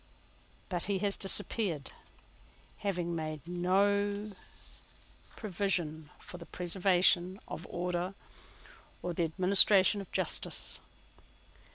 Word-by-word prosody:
But 175 -3 -2
he 200 -1 -1
has 200 - 0
disappeared, 195 - -1 0.9
having 175 -4 -3
made 155 -2 -6
no 200 +4 0 1.0
provision 175 -7 -2
for 180 - -11
the 170 - -11
preservation 180 +1 +1
of 170 - -8
order 180 +2 -3 0.9
or 175 - -3
the 170 0 0
administration 190 +3 +6
of 195 - -13
justice. - - 0
180 Hz, 90 wpm, -31 LUFS, 175-200 Hz, 1.0 s, administration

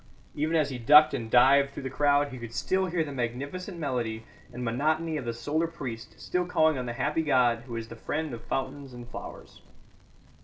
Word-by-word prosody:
Even 155 +3 -1
as 150 -3 +2
he 125 - -5
ducked 150 +6 +7
and 115 -5 -3
dived 135 +4 +5
through 140 - -8
the 130 - -3
crowd 145 +1 +2
he 130 -2 -8
could 120 0 -8
still 190 +8 0
hear 170 -2 0
the 150 - -6
magnificent 140 - -4
melody 120 -7 -2 0.3
and 125 0 -5
monotony 155 +7 0
of 145 -5 -4
the 120 - -1
solar 145 +8 -1
priest 125 -8 -8
still 180 -1 -1
calling 160 -3 +3
on 125 -2 -4
the 120 - -3
happy 150 +6 0
god 125 -6 +2
who 120 - -6
is 115 -1 -5
the 115 - -9
friend 150 +5 -3
of 115 -1 -8
fountains 135 0 -4
and 120 0 -9
flowers. - - -10
140 Hz, 205 wpm, -28 LUFS, 120-155 Hz, 0.3 s, ducked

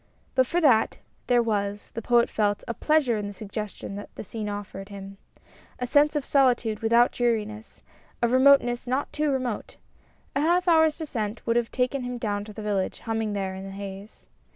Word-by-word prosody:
But 260 -1 +3
for 345 - +1
that, 250 -8 +4 0.3
there 245 -1 +4
was, 205 -2 -2
the 230 - -4
Poet 235 +1 +3
felt, 205 -2 0
a 235 - -2
pleasure 280 -3 +2
in 205 -1 -3
the 205 - -6
suggestions 200 -1 -6
that 205 - -8
the - - -6
scene 215 +1 -5
offered 200 -1 -6
him. 195 -1 -9 0.6
A 250 - -2
sense 290 +4 +3
of 290 -2 -1
solitude 245 -6 +2
without 235 +2 +4
dreariness, 220 -2 -2 0.4
of 235 -1 +1
remoteness 255 -2 +4
not 260 +3 -1
too 300 0 0
remote. 255 -5 -2 0.6
A 280 - +2
half 350 +4 +2
hour's 320 -2 +4
descent 230 -9 -4
would 230 - +1
have 235 -1 +1
taken 255 +2 -1
him 245 0 -4
down 205 -3 -2
to 215 - -9
the 215 +1 -8
village, 200 -3 -1
humming 225 -2 -2
there 195 -2 -2
in 190 0 -7
the 195 - -7
haze. 195 +1 -9
230 Hz, 190 wpm, -26 LUFS, 205-255 Hz, 0.6 s, that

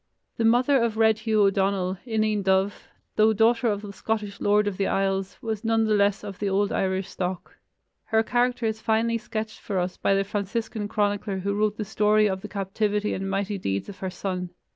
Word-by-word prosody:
The 230 - +1
mother 245 +4 +4
of 230 -2 0
Red 220 -1 +4
Hugh 220 -2 +2
O'Donnell, 195 -2 +1
Ineen 215 -2 0
dubh, 190 +1 +3 0.5
though 220 +1 +5
daughter 230 +3 +3
of 205 -1 -1
the 200 -1 -7
Scottish 210 0 -3
Lord 210 +1 +3
of 205 -2 -2
the 195 - 0
Isles, 195 0 -1
was 220 -2 -3
none 225 0 +2
the 215 - +2
less 200 0 +2
of 200 -3 -7
the 205 - 0
old 200 +1 +1
Irish 190 0 0
stock. 180 -1 -5 0.5
Her 220 -1 +2
character 245 0 +1
is 220 0 -2
finely 230 +1 +1
sketched 220 -1 -5
for 200 - -4
us 180 0 -1
by 195 - +2
the 195 - +2
Franciscan 205 +2 -3
chronicler 205 -1 -1
who 200 +2 -2
wrote 210 +1 0
the 215 - -3
story 210 +1 +3
of 190 -1 -2
the 210 - -6
captivity 210 +1 -1
and 195 +1 -3
mighty 195 +1 -2
deeds 100 - -2
of 195 - -10
her 190 - -3
son. 180 -1 -4
205 Hz, 205 wpm, -25 LUFS, 195-220 Hz, 0.5 s, though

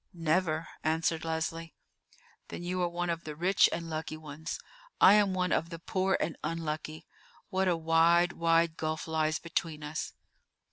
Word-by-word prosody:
"Never," 165 -1 0 0.2
answered 160 0 0
Leslie. 165 0 -3 0.7
"Then - - -7
you 180 +1 -2
are 175 - +1
one 175 0 -2
of 170 0 -4
the 155 -1 -6
rich 180 +5 +4
and 165 0 -3
lucky 155 -1 -4
ones: 155 +1 -6 0.4
I 190 - +8
am 205 -3 +4
one 180 0 0
of 165 - +1
the 165 - -6
poor 190 +2 0
and 160 - -1
unlucky. 155 -1 -4 0.4
What 190 -1 +1
a 175 -2 +2
wide, 165 +2 +4
wide 165 -1 +2
gulf 155 0 -3
lies 155 -1 +1
between 165 -2 -3
us!" 150 +1 -4
165 Hz, 160 wpm, -30 LUFS, 155-175 Hz, 0.7 s, I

